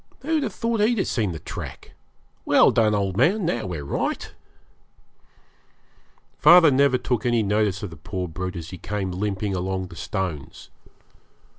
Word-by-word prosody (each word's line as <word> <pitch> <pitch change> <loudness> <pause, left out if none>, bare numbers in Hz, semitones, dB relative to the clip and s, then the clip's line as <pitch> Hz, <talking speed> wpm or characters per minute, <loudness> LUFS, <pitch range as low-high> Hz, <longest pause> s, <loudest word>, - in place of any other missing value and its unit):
Who'd 315 +2 0
have 245 -6 -2
thought 230 -1 -1
he'd 225 +3 +2
have 195 - +1
seen 105 -6 -1
the 80 - -5
track? - - -8 0.5
Well - - +5
done, 110 -2 +2
old 100 -2 -1
man. 195 - +3
Now 120 - -1
we're 85 -5 -5
right.' - - -3 2.1
Father 165 0 +7
never 135 -1 +3
took 125 -3 -2
any 120 -2 +2
notice 105 -1 0
of 100 - -5
the 80 - -11
poor 90 +4 -5
brute 90 +3 -5
as 85 -1 -7
he 90 - -8
came 95 +1 -3
limping 100 +1 -2
along 95 0 -3
the - - -11
stones. 85 -4 -5
105 Hz, 160 wpm, -23 LUFS, 90-135 Hz, 2.1 s, Father